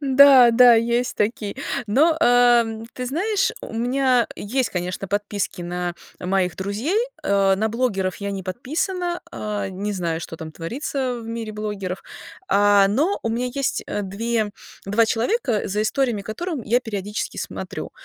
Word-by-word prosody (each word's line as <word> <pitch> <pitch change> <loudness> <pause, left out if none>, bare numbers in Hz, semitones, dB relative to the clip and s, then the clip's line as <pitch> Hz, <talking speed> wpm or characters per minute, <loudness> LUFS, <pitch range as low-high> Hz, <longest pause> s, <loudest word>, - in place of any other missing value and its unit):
Да, 270 -3 +7
да, 240 0 +7
есть 235 +2 +1
такие. 210 +1 -1 0.3
Но, 305 +10 +3
э, 240 -3 +4
ты 250 0 -4
знаешь, 390 - 0
у - - -8
меня 250 +1 +2
есть, 245 +2 -1
конечно, 180 +1 -4
подписки 205 -3 -2
на 175 0 -3 0.3
моих 180 -2 0
друзей. 215 - -1 0.2
Э, 195 -1 +3
на 220 +2 0
блогеров 210 -6 -1
я 200 0 -4
не 195 -1 -4
подписана, 345 - -2
э, 205 -2 -3
не 200 +3 -3
знаю, 170 -3 -2
что 165 - -7
там 160 -1 -8
творится 250 - -3
в 225 - -9
мире 230 -1 -5
блогеров, 205 -3 -4 0.5
а, 205 0 +5
но 305 - +1
у - - -1
меня 235 +3 -1
есть, 275 -1 -1
э, 205 - -3
две 215 +2 -1 0.4
два 210 +3 +3
человека, 235 - 0
за 210 +2 0
историями 240 -3 0
которым 290 - -4
я 240 +4 +2
периодически 210 -2 -4
смотрю, - - -5
225 Hz, 155 wpm, -22 LUFS, 200-250 Hz, 0.5 s, Да